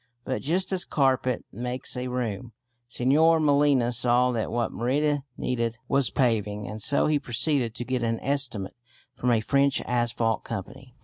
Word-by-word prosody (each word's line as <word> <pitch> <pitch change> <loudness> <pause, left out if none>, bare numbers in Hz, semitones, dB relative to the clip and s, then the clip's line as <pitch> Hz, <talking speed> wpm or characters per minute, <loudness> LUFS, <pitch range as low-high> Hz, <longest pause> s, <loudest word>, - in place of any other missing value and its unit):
But 130 - -2
just 180 +7 0
as 185 - +2
a - - -2
carpet 130 -3 +1
makes 125 +5 -2
a 125 0 -3
room, 120 -2 -4 0.4
Señor 155 +7 +3
Molina 140 -5 +3
saw 125 +1 +2
that 115 -3 -2
what 120 -1 -1
Merida 145 +5 0 0.2
needed 115 -2 -2
was 135 -1 +2
paving, 105 -5 0
and 110 +1 -6
so 140 - +2
he 150 -1 +2
proceeded 125 -2 0
to 120 - -4
get 130 0 -1
an 115 -1 -1
estimate 130 -8 -2 0.4
from 125 - -1
a 115 -2 +3
French 140 +3 +2
asphalt 120 -2 0
company. 125 +6 -8
125 Hz, 165 wpm, -26 LUFS, 115-140 Hz, 0.4 s, Señor